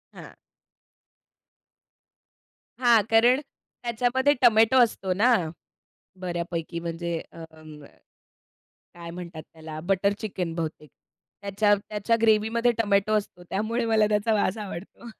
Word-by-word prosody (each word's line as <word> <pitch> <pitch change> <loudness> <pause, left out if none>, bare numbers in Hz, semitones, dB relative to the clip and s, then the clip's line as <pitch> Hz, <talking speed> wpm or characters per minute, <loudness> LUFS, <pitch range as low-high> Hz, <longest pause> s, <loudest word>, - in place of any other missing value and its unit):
हां. - - -11 2.5
हां. 240 -3 +5
कारण 240 +4 +5 0.4
त्याच्यामध्ये 245 +4 +1
टोमॅटो 225 0 +5
असतो 195 -5 -2
ना, 230 +7 +3 0.9
बऱ्यापैकी 170 -2 -4
म्हणजे 170 0 -4
अ - - -16
अं, 155 -2 -14 1.1
काय 170 -1 -10
म्हणतात 170 -2 -8
त्याला 160 -1 -9
बटर 195 +1 +2
चिकन 185 -6 -4
बहुतेक. 160 -2 -5 0.5
त्याच्या 205 +1 +2
त्याच्या 210 +2 -1
ग्रेव्हीमध्ये 225 +2 +3
टोमॅटो 205 0 +1
असतो. 190 -3 -6
त्यामुळे 225 +4 -1
मला 220 -2 +3
त्याचा 210 +2 +1
वास 205 -1 0
आवडतो. 205 +3 -8
205 Hz, 105 wpm, -25 LUFS, 170-225 Hz, 2.5 s, हां